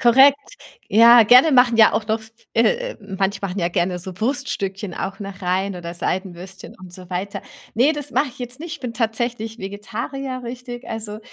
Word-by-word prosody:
Korrekt. 270 +4 +6 0.5
Ja, 230 +2 +7
gerne 255 +7 +7
machen 245 -2 +5
ja 220 -1 +6
auch 215 - -1
noch 220 0 -1 0.3
äh, - - +1
manche 195 -1 -2
machen 195 0 -3
ja 170 -2 +1
gerne 180 +1 -1
so 185 0 -7
Wurststückchen 205 -6 -3
auch 195 0 -5
noch 195 -2 -8
rein 185 +2 -1
oder 170 -1 -7
Seidenwürstchen 185 +1 -5
und 185 - -11
so 180 0 -13
weiter. 185 +3 -4 0.3
Ne, 255 +7 +4
das 295 -2 -6
mache 290 - +1
ich 250 - -15
jetzt 245 +2 -5
nicht. 335 0 -6
Ich - - -25
bin 245 -3 -5
tatsächlich 225 0 -2
Vegetarier, 235 +7 -5
richtig. 245 0 -8
Also, 215 -1 -6
220 Hz, 180 wpm, -21 LUFS, 190-250 Hz, 0.5 s, Ja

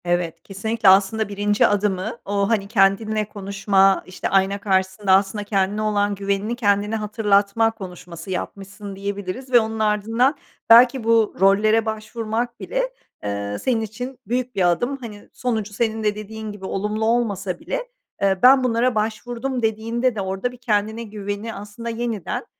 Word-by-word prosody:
Evet, 175 -1 -1
kesinlikle. 210 +2 +1
Aslında 200 +3 +3
1'inci 205 +1 +2
adımı, 205 +2 -1
o, 200 0 0
hani, 210 -4 +1
kendinle 215 +1 +2
konuşma, 195 -1 +2
işte 185 - -4
ayna 195 +1 +2
karşısında, 190 0 0
aslında, 195 +2 +2
"Kendine 200 0 0
olan 205 -1 +1
güvenini, 200 +3 -2
kendine 205 -2 +1
hatırlatma 210 0 +2
konuşması 180 -4 -10
yapmışsın." 195 +2 -6
diyebiliriz 200 +5 -5
ve 245 - +7
onun 220 0 -3
ardından 225 +6 +2 0.3
belki 240 +2 +7
bu 225 -1 +3
rollere 215 +4 +4
başvurmak 220 +2 -3
bile, - - -2 0.3
eee, 100 0 -3
senin 240 -4 +1
için 245 +4 -6
büyük 250 +2 -2
bir 180 -3 +3
adım. 245 +10 -1
Hani, 215 -5 -10
sonucu 220 -4 -2
senin 220 0 -1
de 210 -1 +1
dediğin 215 +1 -7
gibi 205 -2 -9
olumlu 210 +3 -2
olmasa 205 -6 0
bile, - - -4 0.3
eee, 195 -1 +2
"Ben 260 +1 +7
bunlara 240 0 +1
başvurdum." 240 +4 -2
dediğinde 230 +2 0
de, 205 - -2
orada 195 +5 -2
bir 250 - -13
kendine 220 -1 -1
güveni 205 +1 -5
aslında 210 +3 -7
yeniden, 230 -4 -3
210 Hz, 150 wpm, -22 LUFS, 195-230 Hz, 0.3 s, ve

